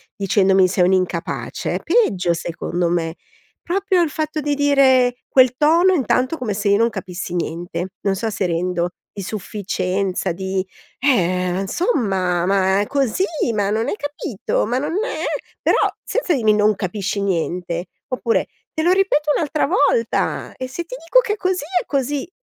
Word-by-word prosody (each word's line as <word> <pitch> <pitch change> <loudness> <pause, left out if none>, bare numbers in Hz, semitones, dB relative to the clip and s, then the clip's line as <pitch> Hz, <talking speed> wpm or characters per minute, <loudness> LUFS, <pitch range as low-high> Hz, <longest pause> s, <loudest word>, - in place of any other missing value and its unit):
dicendomi: 195 -1 +3
"Sei 180 0 +1
un'incapace", 185 -2 -1
é - - -1
peggio, 325 - +2
secondo 170 +1 -2
me, 165 -1 -1 0.5
proprio 375 0 +1
il 315 - -1
fatto 310 0 -2
di 290 0 0
dire 265 -3 +4
quel 255 -1 +5
tono 340 +5 +4
intanto, 260 - +1
come 220 -5 -2
se 200 0 -1
io 200 - +5
non 230 +1 +3
capissi 180 -1 -6
niente, 175 +2 -3
non 195 -1 +1
so 225 +3 -2
se 195 -2 -2
rendo, 175 0 -1 0.2
di 200 - -7
sufficienza 190 -2 -2
di: 190 +1 -2 0.4
"Eh, 185 -7 +1
insomma, 190 - 0
ma 195 +1 +2
così! 275 - 0 0.3
Ma 200 -1 +1
non 225 +4 0
hai - - -1
capito? 290 - -2
Ma 245 +2 0
non 300 +4 -3
è"; - - -4 0.4
però - - +3 0.3
senza 385 -9 0
dirmi: 220 -4 +3
"Non 210 0 +3
capisci 200 +1 -3
niente"; 175 -1 -2 0.2
oppure: 250 -2 0 0.3
"Te 315 - 0
lo 355 - +4
ripeto 310 -6 +2
un'altra 305 -1 0
volta 235 -7 +1
e 255 -1 -5
se 340 +7 -5
ti 290 - -11
dico - - +4
è 420 -2 -1
così 370 -5 -1 0.2
è - - -14
così!" 280 +3 -1
215 Hz, 160 wpm, -20 LUFS, 185-290 Hz, 0.5 s, quel